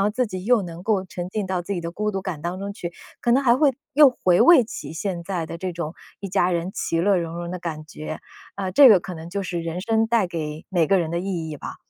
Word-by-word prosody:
然 - - +3
后 205 - +3
自 250 +3 0
己 185 -3 -6
又 240 -3 +3
能 170 0 -8
够 200 -3 +1
沉 180 -1 -6
浸 210 -2 -2
到 180 -1 -2
自 200 - -4
己 175 - -2
的 170 0 -5
孤 210 +4 -2
独 195 -1 -4
感 175 -6 -4
当 175 +2 -3
中 200 0 -4
去， 175 -3 -6 0.3
可 235 - +2
能 270 +3 +4
还 240 -1 +4
会 280 -1 +4 0.2
又 290 -2 +8
回 180 -7 +2
味 335 -7 +8
起 150 -8 -7
现 175 +1 -3
在 175 -4 -3
的 165 - -6
这 185 0 -3
种 170 -1 -5 0.3
一 195 - -5
家 180 -1 +2
人 175 +1 -1
其 165 - -1
乐 195 +2 +3
融 170 -1 -3
融 170 0 -5
的 180 - -4
感 155 -3 -5
觉。 155 0 -7 0.4
啊， 190 -2 -2
这 270 +8 +8
个 195 - +6
可 180 +1 -7
能 160 +1 -8
就 200 +1 -2
是 175 -2 -3
人 165 +2 -4
生 225 +2 +1
带 230 -4 +2
给 155 -2 -5
每 175 -5 +2
个 195 +2 +4
人 165 -2 -1
的 170 - -1
意 175 -4 -3
义 150 - -6
吧。 - - -8
180 Hz, 305 characters per minute, -23 LUFS, 170-205 Hz, 0.4 s, 又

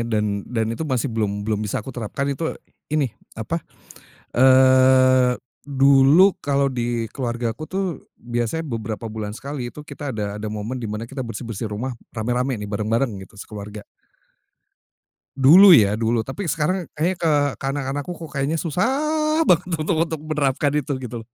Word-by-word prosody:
dan 105 -3 -1
dan 115 -2 -1
itu 115 - -7
masih 130 -5 -1
belum 105 -2 -2
belum 105 -1 -1
bisa 105 0 -3
aku 135 - -7
terapkan 120 +4 -4
itu 140 +4 -2 0.3
ini, 145 -6 0 0.2
apa 115 +10 -3 0.7
eee, 130 0 +5 0.2
dulu 140 +6 +5
kalau 140 -1 +1
di 120 -3 -2
keluargaku 120 +1 -3
tuh 195 +1 -1 0.3
biasanya 120 +7 -3
beberapa 115 -2 -4
bulan 110 -1 -5
sekali 130 +1 -6
itu 150 0 -11
kita 145 -1 -6
ada 105 -3 -3
ada 110 - -3
momen 110 +4 -4
dimana 110 +1 -4
kita 135 +2 -5
bersih-bersih 115 -2 -5
rumah 120 +5 -4 0.2
rame-rame 125 +2 -1
nih 105 - -5
bareng-bareng 110 +3 -1
gitu 100 +1 -15
sekeluarga. 105 0 -8 1.5
Dulu 170 +9 +8
ya 105 -3 +4
dulu 115 0 0
tapi 165 +7 -5
sekarang 165 +4 -1
kayaknya 175 +4 0
ke 165 -2 +2 0.3
ke - - -9
anak-anak 140 0 -3
ku 180 - -4
kok 165 -2 -9
kayaknya 140 +4 0
susah 305 - 0
banget 180 +1 +3
untuk 160 +2 0
untuk 160 -2 -5
menerapkan 145 -2 0
itu, 150 0 -1
gitu. 120 -2 -6
130 Hz, 155 wpm, -22 LUFS, 110-150 Hz, 1.5 s, Dulu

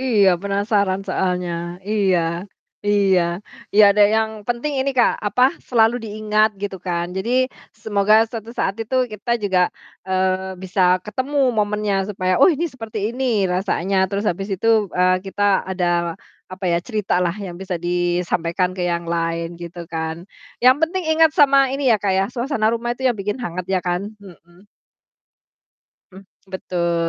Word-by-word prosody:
Iya, 220 -7 +3
penasaran 200 -1 0
soalnya. 180 -2 -1 0.4
Iya, 200 -4 +2 0.7
iya, 200 -3 +3 0.5
iya, 215 - +7
ada 205 +1 +4
yang 220 0 +1 0.2
penting 240 +5 -1
ini, 275 - 0
Kak, 240 - +4
apa, 250 +5 +1 0.3
selalu 225 -1 +4
diingat 215 0 +1
gitu, 200 -1 -3
kan, 175 -1 -1
jadi 190 +5 -2 0.5
semoga 205 0 +2
suatu 225 -1 -8
saat 195 - 0
itu 225 +4 -6 0.2
kita 215 +3 -6
juga, 190 -3 +2 0.5
eee, 190 0 -1
bisa 185 -1 +2
ketemu 260 +6 -2 0.2
momennya 210 -1 0 0.2
supaya, 185 -2 -1
"Oh, - - +8
ini 330 +1 -1
seperti 225 -3 -6 0.2
ini 240 -6 +1
rasanya." 190 0 -1
Terus, 200 +2 -2
habis 195 +3 -5
itu, 190 +4 -4 0.3
eee, 185 0 +4
kita 200 +1 -4 0.3
ada, 185 -1 -1 0.6
apa 185 +1 -8
ya, 170 - +2
ceritalah 180 -6 -1
yang 190 -4 -6
bisa 190 -1 -4
disampaikan 175 0 0
ke 180 - -3
yang 170 0 -2
lain, 165 0 -2
gitu, 170 0 -8
kan. 160 +1 -5 0.3
Yang 255 +2 +5
penting 360 +3 0
ingat 320 0 +4
sama 275 -2 +5
ini 275 +1 -2
ya, 210 - -3
Kak 200 -2 +1
ya, 190 - +2
suasana 240 -2 -1
rumah 235 +1 -3
itu 260 - 0
yang 250 - +3
bikin 205 +4 -3
hangat 180 -7 -4
ya 190 - +2
kan? 180 +3 -3
Mhm. 180 -1 -17 1.5
Mmm, 190 +1 -13 0.3
betul. 170 -2 -1
195 Hz, 155 wpm, -20 LUFS, 180-220 Hz, 1.5 s, Oh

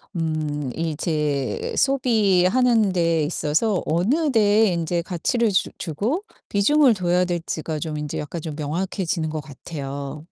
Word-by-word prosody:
음 155 -4 -2
이 160 -2 -2
제 150 -4 -1
소비하는 225 -3 +3
데에 165 -3 +2
있어서 170 +6 0
어느 255 - +1
데에 215 -2 +4
이제 170 0 -1
가치를 205 +7 0
주 190 - +1
주고 215 - -2 0.3
비중을 255 +6 +4
둬야 180 -1 +1
될지가 165 -3 -3
좀 155 0 -4
인제 150 -1 -4
약간 155 +3 -5
좀 155 -2 -6
명확해지는 165 +2 -2
것 155 0 -3
같아요. 140 0 -7
170 Hz, 275 characters per minute, -23 LUFS, 155-210 Hz, 0.3 s, 데에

